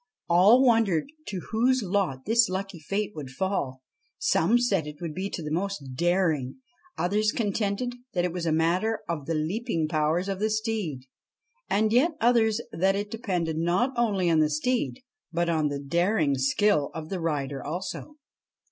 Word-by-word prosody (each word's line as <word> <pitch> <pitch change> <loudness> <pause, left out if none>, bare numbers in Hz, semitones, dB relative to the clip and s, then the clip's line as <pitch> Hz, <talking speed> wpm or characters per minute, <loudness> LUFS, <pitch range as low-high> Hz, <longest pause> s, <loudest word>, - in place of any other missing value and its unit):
All 195 +9 +6
wondered 225 - +2 0.2
to 190 -3 -4
whose 245 +2 +2
lot 180 -9 -1
this 230 +2 +4
lucky 190 -1 -4
fate 200 +7 -2
would 145 -4 -7
fall. 130 -4 -2 0.3
Some 195 +9 +3
said 200 -10 +1
it 150 -1 -9
would 165 -3 -5
be 190 +4 -3
to 170 - -5
the 150 - -5
most 180 -4 -2
daring, 165 -4 +1 0.4
others 210 +4 +1
contended 210 +2 -1 0.2
that 175 -1 +1
it 175 - -2
was 175 -2 -3
a - - +2
matter 175 +8 +1
of 155 -5 -4
the 165 - 0
leaping 165 +1 -1
powers 155 +3 0
of 195 -1 -3
the 215 +1 +1
steed, 215 - -2 0.7
and 215 +1 +2
yet 300 +8 +4
others 230 -2 +3
that 190 +3 +2
it 205 +1 -3
depended 180 -8 -2
not 180 +11 +1
only 205 -7 +1
on 165 -2 +4
the 155 -1 +3
steed 250 - -1 0.3
but 170 0 0
on 160 -2 +1
the 145 -1 -2
daring 165 +2 +1
skill 145 +4 +2
of 160 -1 -6
the 190 - -3
rider 145 -5 -2
also. 185 - -5
185 Hz, 170 wpm, -27 LUFS, 155-215 Hz, 0.7 s, All